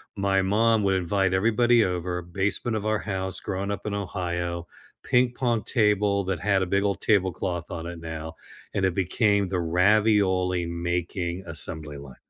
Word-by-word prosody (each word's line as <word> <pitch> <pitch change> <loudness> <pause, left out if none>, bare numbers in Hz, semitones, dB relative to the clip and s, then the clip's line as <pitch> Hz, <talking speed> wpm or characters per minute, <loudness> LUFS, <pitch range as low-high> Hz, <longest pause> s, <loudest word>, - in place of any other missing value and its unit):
My 100 -1 +1
mom 110 +3 +2
would 95 -1 +2
invite 95 +1 0
everybody 115 +4 +3
over, 90 -1 -2
basement 100 +6 -1
of 105 - -5
our 110 -1 +1
house, 95 -2 -3
growing 100 +1 -3
up 100 - -5
in 105 - -2
Ohio, 85 -3 -3 0.3
ping-pong 120 -2 +1
table 105 -2 +2
that 95 -3 -2
had 100 0 +1
a - - +1
big 100 +2 +1
old 100 -1 -1
tablecloth 90 -4 0
on 85 0 -5
it 85 -1 -7
now, 80 0 -7 0.4
and 95 - +1
it 95 - +1
became 100 +2 +1
the 90 -1 -2
ravioli-making 90 -2 +1
assembly 80 -2 0
line 70 -2 -11
95 Hz, 155 wpm, -25 LUFS, 85-105 Hz, 0.4 s, everybody